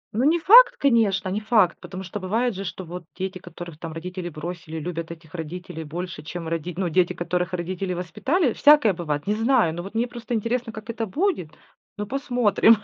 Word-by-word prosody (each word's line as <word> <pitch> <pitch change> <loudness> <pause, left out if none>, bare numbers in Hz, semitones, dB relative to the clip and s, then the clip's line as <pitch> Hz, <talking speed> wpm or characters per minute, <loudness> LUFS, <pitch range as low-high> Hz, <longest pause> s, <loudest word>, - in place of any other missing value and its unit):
Но 245 - +2
не 335 +3 +4
факт, - - +8
конечно, 225 -8 +2
не 200 +3 -1
факт. 215 -5 +3
Потому 190 0 -7
что 190 +3 -6
бывает 220 +5 0
же, 195 - -5
что 185 0 -6
вот 175 +1 -8
дети, 185 0 -4
которых 175 -3 -10
там 165 -2 -6
родители 180 +1 -5
бросили, 160 0 -6
любят 165 0 -4
этих 165 -1 -12
родителей 165 0 -6
больше, 175 +4 -6
чем 165 +2 -6
роди 165 +1 -3
Ну, 185 -2 0
дети, 175 +2 +2
которых 180 +1 -2
родители 180 +1 -2
воспитали, 255 - 0
всякое 290 -9 +6
бывает, 150 -3 -3
не 205 - +2
знаю. 225 -6 +3
Но 175 - -4
вот 200 +4 -9
мне 235 +2 +1
просто 240 0 -5
интересно, 230 +2 -1
как 215 +1 -10
это 225 -1 -3
будет. 305 - 0 0.5
Ну, 210 - -3
посмотрим. 245 -3 +3
185 Hz, 195 wpm, -24 LUFS, 175-230 Hz, 0.5 s, факт